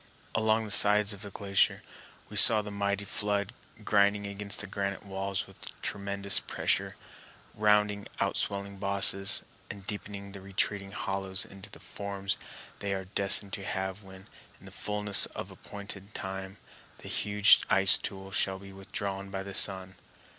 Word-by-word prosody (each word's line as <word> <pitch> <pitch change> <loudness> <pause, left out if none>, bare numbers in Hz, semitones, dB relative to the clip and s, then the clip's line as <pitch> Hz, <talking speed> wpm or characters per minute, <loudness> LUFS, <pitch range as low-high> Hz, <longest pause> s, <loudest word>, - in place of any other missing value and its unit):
Along 110 0 +1
the 105 - -5
sides 105 +1 +5
of 100 - -11
the 100 - -6
glacier 100 0 0 0.4
we - - -11
saw 110 -2 +9
the 105 - -8
mighty 100 0 -2
flood 100 -1 -1 0.3
grinding 100 0 +2
against 100 0 -4
the - - -6
granite 100 0 -4
walls 100 +1 -4
with 95 - -13
tremendous 100 0 0
pressure, - - -1 0.6
rounding 105 -1 +1
outswelling 100 0 -2
bosses, 100 0 +5 0.3
and 100 -1 -9
deepening 100 -1 -6
the 100 -1 -10
retreating 100 +1 -2
hollows 95 -1 -4
into 100 +2 -13
the - - -12
forms 100 -1 -5 0.4
they 100 -1 -2
are 95 -1 -6
destined 100 0 +5
to 100 - -4
have 95 +1 -4
when, 95 -1 -14 0.3
in - - -18
the - - -12
fullness 105 -1 0
of - - -7
appointed 100 0 -11
time, 95 0 -6 0.4
the - - -12
huge 105 -1 +4
ice 95 +1 +5
tool 95 0 -6
shall 95 0 0
be 95 0 -13
withdrawn 95 0 -6
by 95 0 -5
the 100 0 -8
sun. 95 -1 +2
100 Hz, 155 wpm, -29 LUFS, 95-100 Hz, 0.6 s, saw